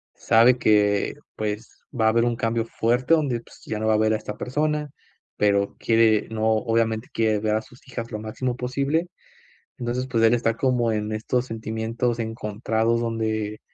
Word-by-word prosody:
sabe 120 +3 +5
que, 105 -3 +2 0.2
pues, 105 +1 -5 0.2
va 110 - +3
a - - +6
haber 115 +1 +3
un 120 -1 0
cambio 115 0 0
fuerte 120 +5 +1
donde, 140 -7 +1
pues, - - -18
ya 110 - -3
no 110 - -1
va 110 - +4
a - - +3
ver 110 0 +2
a - - +2
esta 105 -1 -7
persona, 150 +3 -1 0.5
pero 100 -1 +1
quiere, 110 -2 +3
¿no? 110 -1 -2
Obviamente 115 0 0
quiere 110 -2 +1
ver 105 0 0
a 110 - 0
sus 120 +3 -19
hijas 115 -2 -6
lo 105 - -4
máximo 120 +4 -3
posible. 140 +7 -1 0.7
Entonces, 125 +1 -2
pues, 115 -3 +1
él 115 - +5
está 115 -1 +1
como 125 -3 +1
en 105 0 -2
estos 120 +3 -1
sentimientos 115 +2 -2
encontrados 110 +1 -1
donde, 110 -2 -2
115 Hz, 180 wpm, -24 LUFS, 110-120 Hz, 0.7 s, a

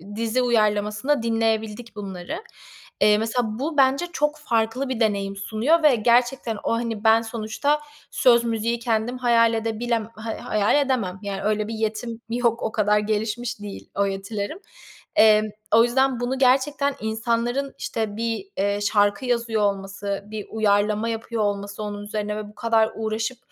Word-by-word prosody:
dizi 230 +3 0
uyarlamasında 215 +3 +1
dinleyebildik 225 0 -1
bunları. 200 - -6 0.6
Eee, 210 0 +6
mesela 225 0 -1
bu 300 +3 -3
bence 275 +5 +3
çok 295 0 0
farklı 235 0 0
bir 255 -3 -2
deneyim 200 -3 0
sunuyor 230 +11 +1
ve 295 -4 +6
gerçekten 240 0 +2
o, - - 0
hani, 230 -2 -2
ben 225 0 +5
sonuçta 230 +6 -1 0.3
söz, 235 -2 +4
müziği 230 0 -1
kendim 230 +1 -1
hayal 230 -2 +4
edebilem 225 0 -1
hay 220 +1 -5
hayal 210 -1 +1
edemem, 210 -9 -1
yani, 200 -1 -4
öyle 215 0 0
bir 225 - -5
yetim 220 +1 -3
yok, 235 0 0
o 220 - -1
kadar 210 -1 +2
gelişmiş 215 +2 -2
değil 205 -1 -8
o 200 - +2
yetilerim. 200 - -4 0.6
Emm, 215 0 +6 0.3
o 230 - +7
yüzden 260 +1 +2
bunu 245 +2 -1
gerçekten 275 +2 +2
insanların, 235 +5 -1
işte, 215 -2 -3
bir, 230 - -2
eee, 200 +1 +1
şarkı 205 +3 +2
yazıyor 235 -3 0
olması, 200 0 -2
bir 215 -1 -6
uyarlama 210 +1 +1
yapıyor 225 0 -2
olması 200 0 -3
onun 205 0 -5
üzerine 210 0 -3
ve 210 -1 -6
bu 210 - -18
kadar 225 -1 +2
uğraşıp 225 +3 -2
225 Hz, 155 wpm, -23 LUFS, 210-240 Hz, 0.6 s, o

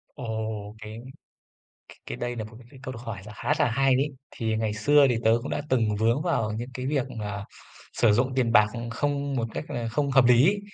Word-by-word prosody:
Ồ, 110 -4 -4
cái 110 +2 -8 1.1
cái - - -5
đây 120 0 -3
nà 110 - -4
một 110 +1 -11
cái 120 - -16
cái 135 - -14
câu 130 -1 -5
hỏi 115 -4 -6
là 105 - -10
khá 130 +5 0
là - - +3
hay 135 +1 +3
đấy. 135 +3 +2 0.2
Thì 110 -3 -2
ngày 110 -1 -1
xưa 140 +7 +5
thì 120 - +1
tớ 110 - +5
cũng 135 - -6
đã - - -1
từng 115 -5 +2
vướng 115 +6 +2
vào 135 -11 0
những 120 +2 -5
cái 130 +1 -5
việc 135 -3 0
mà 105 -1 -4 0.5
sử 115 -3 +4
dụng 130 +4 +1
tiền 125 -3 +2
bạc 105 -2 +7 0.3
không 140 +2 -1
một 115 -2 -1
cách - - -3
là 120 -1 -3
không 140 +4 -1
hợp 135 -2 +5
lý 125 +4 +6
ấy, 205 +2 +2
120 Hz, 230 wpm, -26 LUFS, 110-135 Hz, 1.1 s, bạc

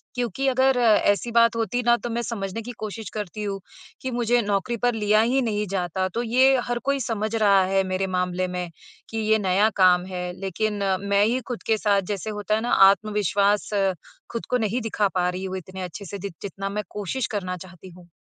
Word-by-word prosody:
क्योंकि 250 +2 -1
अगर 265 0 +3
ऐसी 215 0 +3
बात 230 0 +4
होती 230 +2 -1
ना, 240 0 +5
तो 240 - -6
मैं 235 +1 -1
समझने 205 -2 -4
की 240 +2 -7
कोशिश 215 -1 -6
करती 210 0 -5
हूँ 200 -1 -3 0.4
कि 260 - -3
मुझे 240 0 +2
नौकरी 205 +2 -1
पर 245 - +3
लिया 215 -1 +3
ही 250 +4 +2
नहीं 210 -3 -1
जाता, 185 0 -1
तो 235 +6 -3
ये 260 +3 +4
हर 240 0 -2
कोई 280 0 +1
समझ 220 -3 -2
रहा 200 -3 +5
है 195 +1 +2
मेरे 185 +1 -1
मामले 180 0 0
में, 180 -1 -4 0.4
कि 225 - -5
ये 220 0 +2
नया 200 +2 +3
काम 180 -2 +5
है, 180 -1 -4
लेकिन 200 +2 -2 0.3
मैं 200 0 +4
ही 240 +4 +1
खुद 245 -2 -5
के 220 - +3
साथ, 205 -2 +2
जैसे 200 +2 -5
होता 210 +1 0
है 220 - -1
ना, 240 - -2 0.2
आत्मविश्वास 205 0 +1 0.6
खुद 230 - -4
को 250 - +2
नहीं 225 +1 -1
दिखा 215 -2 0
पा 180 -1 +2
रही 180 +1 -4
हूँ 190 0 -4
इतने 185 +1 -8
अच्छे 180 +3 -7
से, 200 +2 -6
जित 200 -1 -6
जितना 195 0 -5
मैं 210 +1 -3
कोशिश 210 +5 -3
करना 185 -3 -3
चाहती 185 0 -12
हूँ। 175 0 -15
210 Hz, 210 wpm, -24 LUFS, 190-230 Hz, 0.6 s, ना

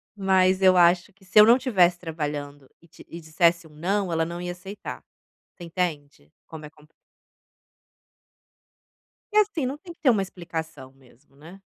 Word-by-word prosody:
Mas 190 -1 +2
eu 185 -1 +5
acho 175 +2 +3
que 195 0 -25
se 185 - -3
eu 210 - +9
não 235 +3 +6
tivesse 185 -10 +2
trabalhando 145 -4 -6
e 170 - -22
te 165 - -17
e 170 - -9
dissesse 170 +1 +1
um - - -21
"não", 190 +4 -2
ela 165 0 0
não 170 +1 -6
ia 175 0 -4
aceitar. 195 +3 -9 0.5
Você 175 - -13
entende? 150 - -5 0.2
Como 155 -2 -10
é - - -10
compli 150 0 -24 2.4
E 425 - +1
assim, 390 -10 +2
não 275 +3 -4
tem 345 +2 -12
que - - -38
ter 275 - +3
uma 210 -5 +3
explicação 160 -7 -7
mesmo, 135 +1 -25
né. 170 +7 -15
175 Hz, 175 wpm, -24 LUFS, 155-195 Hz, 2.4 s, eu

